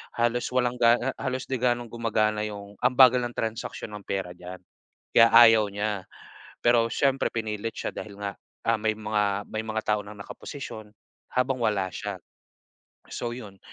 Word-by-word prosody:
Halos 120 Hz, +1 st, +1 dB
walang 125 Hz, -1 st, +1 dB
ga 120 Hz, 0 st, +6 dB, 0.2 s
halos 130 Hz, -1 st, -2 dB
di 130 Hz, -2 st, -3 dB
gano'ng 120 Hz, -2 st, 0 dB
gumagana 110 Hz, -2 st, 0 dB
yung 100 Hz, -1 st, -9 dB
ang 125 Hz, -, +2 dB
bagal 130 Hz, -1 st, +7 dB
ng 120 Hz, -, -13 dB
transaksiyon 110 Hz, -1 st, -4 dB
ng -, -, -19 dB
pera 95 Hz, -2 st, -2 dB
diyan 90 Hz, +1 st, -9 dB, 0.5 s
kaya 115 Hz, -, +7 dB
ayaw 115 Hz, -2 st, +8 dB
niya. 105 Hz, -2 st, -2 dB, 0.6 s
Pero 120 Hz, -1 st, +4 dB
siyempre, 135 Hz, +2 st, +1 dB
pinilit 110 Hz, 0 st, -4 dB
siya -, -, -3 dB
dahil 100 Hz, -2 st, -8 dB
nga, 100 Hz, -1 st, -4 dB, 0.3 s
ah, 115 Hz, -1 st, +2 dB
may 110 Hz, 0 st, +1 dB
mga 105 Hz, -2 st, 0 dB
may 110 Hz, -, -1 dB
mga 110 Hz, 0 st, -2 dB
tao 105 Hz, -1 st, +1 dB
ng 105 Hz, +1 st, -10 dB
nakaposisyon 110 Hz, 0 st, -8 dB, 0.4 s
habang 125 Hz, +1 st, +1 dB
wala 100 Hz, -5 st, +1 dB
siya. 100 Hz, -2 st, -5 dB, 0.9 s
So, 120 Hz, 0 st, -4 dB
yun. 100 Hz, -6 st, -10 dB
110 Hz, 160 wpm, -26 LUFS, 105-120 Hz, 0.9 s, ayaw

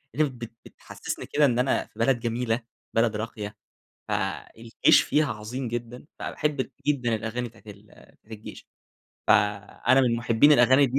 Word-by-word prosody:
اللي 150 Hz, -1 st, +2 dB
بت 120 Hz, -3 st, -9 dB
بتحسّسني -, -, -7 dB
كده 150 Hz, 0 st, +2 dB
إن 125 Hz, -2 st, +2 dB
أنا 130 Hz, +1 st, +1 dB
في -, -, -20 dB
بلد 135 Hz, -3 st, +2 dB
جميلة 115 Hz, 0 st, -1 dB, 0.3 s
بلد 115 Hz, -1 st, +2 dB
راقية، 105 Hz, -1 st, -5 dB, 0.5 s
فالجيش 115 Hz, 0 st, +1 dB
فيها 150 Hz, -3 st, +1 dB
عظيم 115 Hz, +4 st, -5 dB
جدًا، 120 Hz, +2 st, -6 dB
فأحب 145 Hz, -4 st, -2 dB, 0.2 s
جدًا 125 Hz, -6 st, +1 dB
الأغاني 115 Hz, +3 st, -3 dB
بتاعة 115 Hz, 0 st, -18 dB
ال 100 Hz, 0 st, -11 dB, 0.4 s
بتاعة 110 Hz, -, -12 dB
الجيش، 110 Hz, -, -11 dB, 0.6 s
فأنا 105 Hz, +5 st, +3 dB
من 120 Hz, -3 st, +2 dB
محبين 120 Hz, +5 st, +4 dB
الأغاني 130 Hz, +2 st, +6 dB
دي. 130 Hz, +2 st, 0 dB
120 Hz, 150 wpm, -26 LUFS, 115-130 Hz, 0.6 s, الأغاني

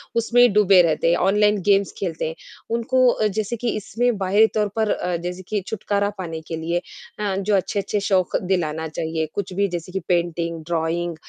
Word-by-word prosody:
उसमें 235 Hz, +1 st, +3 dB
ही 245 Hz, -, +8 dB
डूबे 195 Hz, -3 st, +6 dB
रहते 165 Hz, 0 st, +1 dB
हैं 170 Hz, -, +3 dB
ऑनलाइन 210 Hz, 0 st, +3 dB
गेम्स 200 Hz, -1 st, +3 dB
खेलते 165 Hz, -4 st, -2 dB
हैं। 160 Hz, -, -5 dB, 0.4 s
उनको 255 Hz, +2 st, +2 dB
अ, 215 Hz, -2 st, +1 dB
जैसे 215 Hz, +2 st, -2 dB
कि 235 Hz, +1 st, -2 dB
इसमें 230 Hz, +2 st, -1 dB
बाहरी 200 Hz, +3 st, +4 dB
तौर 210 Hz, -1 st, +2 dB
पर 220 Hz, -2 st, +1 dB
अ, 180 Hz, -1 st, -1 dB
जैसे 180 Hz, +2 st, -5 dB
कि 210 Hz, -2 st, -1 dB
छुटकारा 205 Hz, -1 st, -1 dB
पाने 165 Hz, -3 st, -5 dB
के 165 Hz, -, -4 dB
लिए 170 Hz, +2 st, -1 dB, 0.4 s
अ, 205 Hz, -2 st, -1 dB
जो 200 Hz, +1 st, +1 dB
अच्छे-अच्छे 200 Hz, +2 st, -1 dB
शौक 185 Hz, -2 st, +2 dB
दिलाना 160 Hz, -4 st, -1 dB
चाहिए 160 Hz, +1 st, -3 dB
कुछ 190 Hz, -2 st, -4 dB
भी 200 Hz, +1 st, +1 dB
जैसे 175 Hz, 0 st, -5 dB
कि 190 Hz, -, -2 dB
पेंटिंग, 170 Hz, -1 st, -1 dB
ड्रॉइंग 170 Hz, 0 st, -1 dB
190 Hz, 190 wpm, -22 LUFS, 170-210 Hz, 0.4 s, ही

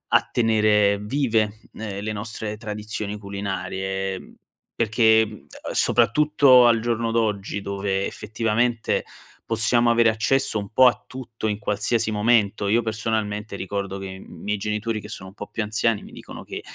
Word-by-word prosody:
a -, -, +3 dB
tenere 105 Hz, -3 st, +3 dB
vive, 110 Hz, -3 st, 0 dB
ehm, 100 Hz, -2 st, -6 dB
le 110 Hz, -, -2 dB
nostre 105 Hz, 0 st, -4 dB
tradizioni 105 Hz, -1 st, -5 dB
culinarie, 95 Hz, -1 st, -4 dB, 0.4 s
perché, 110 Hz, 0 st, +4 dB
mhmm, 105 Hz, -1 st, -11 dB, 0.3 s
soprattutto 130 Hz, +1 st, +5 dB
al 115 Hz, -1 st, +4 dB
giorno 115 Hz, -1 st, -1 dB
d'oggi, 105 Hz, -3 st, -1 dB
dove 100 Hz, 0 st, -2 dB
effettivamente 115 Hz, +2 st, -1 dB, 0.4 s
possiamo 120 Hz, +1 st, +2 dB
avere 115 Hz, -1 st, +5 dB
accesso 135 Hz, +3 st, +1 dB
un 100 Hz, -1 st, -6 dB
po' 130 Hz, +3 st, +6 dB
a 120 Hz, -, +1 dB
tutto 120 Hz, -4 st, -6 dB
in 105 Hz, -1 st, -1 dB
qualsiasi 110 Hz, +2 st, 0 dB
momento, 105 Hz, -2 st, +2 dB
io 115 Hz, +4 st, +3 dB
personalmente 110 Hz, -1 st, -2 dB
ricordo 100 Hz, 0 st, -4 dB
che 95 Hz, -, -7 dB
i 95 Hz, 0 st, -7 dB
miei 105 Hz, +1 st, -5 dB
genitori, 105 Hz, +2 st, -2 dB
che 105 Hz, -, -10 dB
sono 95 Hz, -3 st, -8 dB
un 95 Hz, -, -18 dB
po' 105 Hz, -, -7 dB
più 115 Hz, -, -3 dB
anziani, 110 Hz, 0 st, 0 dB
mi -, -, -12 dB
dicono -, -, -10 dB
che, -, -, -7 dB
110 Hz, 150 wpm, -23 LUFS, 100-115 Hz, 0.4 s, po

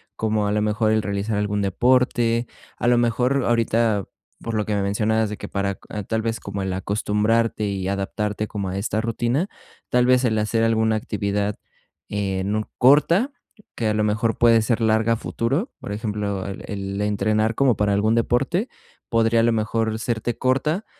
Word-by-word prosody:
como 110 Hz, -1 st, 0 dB
a -, -, 0 dB
lo 105 Hz, 0 st, +1 dB
mejor 110 Hz, +1 st, +1 dB
el 110 Hz, -1 st, +2 dB
realizar 100 Hz, +1 st, -2 dB
algún 105 Hz, 0 st, -1 dB
deporte, 120 Hz, +3 st, +2 dB, 0.3 s
a -, -, -1 dB
lo 120 Hz, 0 st, +4 dB
mejor 125 Hz, +3 st, +1 dB
ahorita, 115 Hz, -3 st, +1 dB, 0.4 s
por 115 Hz, -1 st, -4 dB
lo 105 Hz, -1 st, 0 dB
que 105 Hz, -, -2 dB
me 100 Hz, -, 0 dB
mencionabas 110 Hz, +2 st, +1 dB
de 105 Hz, -, -5 dB
que, -, -, -7 dB
ah, -, -, -16 dB
para 100 Hz, -1 st, -1 dB, 0.3 s
tal 110 Hz, 0 st, 0 dB
vez 115 Hz, 0 st, -2 dB
como 100 Hz, 0 st, -5 dB
el 95 Hz, -1 st, -2 dB
acostumbrarte 105 Hz, +3 st, 0 dB
y 95 Hz, -2 st, -3 dB
adaptarte 105 Hz, +2 st, -2 dB
como 100 Hz, -3 st, -4 dB
a 95 Hz, -, -3 dB
esta 110 Hz, +2 st, -1 dB
rutina, 120 Hz, -, -1 dB, 0.4 s
tal 125 Hz, 0 st, +3 dB
vez 130 Hz, 0 st, +4 dB
el 110 Hz, -2 st, +1 dB
hacer 115 Hz, +2 st, 0 dB
alguna 110 Hz, -1 st, +2 dB
actividad, 100 Hz, -1 st, -2 dB, 0.5 s
eh, 95 Hz, -2 st, -2 dB
nu 105 Hz, +2 st, -1 dB, 0.2 s
corta, 165 Hz, -, +4 dB, 0.4 s
que 115 Hz, -, -1 dB
a 105 Hz, -, +1 dB
lo 105 Hz, 0 st, +1 dB
mejor 110 Hz, +2 st, 0 dB
puede 115 Hz, -1 st, +5 dB
ser 115 Hz, +1 st, 0 dB
larga 110 Hz, +1 st, +3 dB
a -, -, +2 dB
futuro, 135 Hz, -, -2 dB
por -, -, -7 dB
ejemplo, 105 Hz, -3 st, -3 dB
el 100 Hz, -1 st, -6 dB
el 100 Hz, 0 st, -4 dB
entrenar 105 Hz, +2 st, +1 dB
como 130 Hz, -3 st, +3 dB
para 105 Hz, -1 st, +1 dB
algún 110 Hz, +3 st, +2 dB
deporte, 135 Hz, -, +1 dB, 0.4 s
podría 115 Hz, 0 st, +3 dB
a -, -, +2 dB
lo 120 Hz, -, +3 dB
mejor 110 Hz, 0 st, -1 dB
serte 115 Hz, 0 st, -2 dB
corta, 150 Hz, +9 st, 0 dB
110 Hz, 185 wpm, -22 LUFS, 105-115 Hz, 0.5 s, puede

